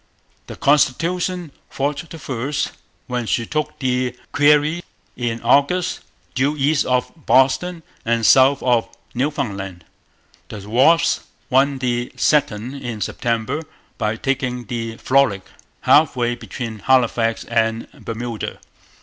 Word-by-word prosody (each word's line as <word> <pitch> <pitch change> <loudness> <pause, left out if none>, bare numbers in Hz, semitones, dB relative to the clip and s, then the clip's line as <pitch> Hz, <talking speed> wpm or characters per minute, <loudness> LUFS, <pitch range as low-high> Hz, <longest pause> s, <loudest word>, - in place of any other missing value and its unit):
The - - -8
Constitution 170 +4 +1 0.2
fought 145 +3 -3
the 165 - -8
first, 140 0 -3 0.3
when 125 -3 -3
she 115 - 0
took 150 +2 -3
the 125 -2 -1 0.2
Guerriere 150 +3 +4 0.3
in 120 -2 -2
August, 145 +9 +2 0.3
due 140 +4 +1
east 145 +1 +2
of 125 -1 +1 0.2
Boston 160 +6 +3 0.2
and 115 -2 +1
south 135 +3 +5
of 120 -3 +2 0.2
Newfoundland. 100 - -3 0.6
The 100 -2 -8
Wasp 135 +10 +3 0.3
won 135 +2 +3
the 120 -2 -1
second 130 -5 +1
in 120 -3 -4
September, 115 +6 -2 0.4
by 105 -1 0
taking 125 -1 -2
the 115 0 -4
Frolic 130 -8 +2 0.4
half 150 -1 +5
way 120 -1 0
between 115 -2 -6
Halifax 115 -1 +2
and 115 -1 0
Bermuda. 115 -1 -5
125 Hz, 115 wpm, -20 LUFS, 115-145 Hz, 0.6 s, south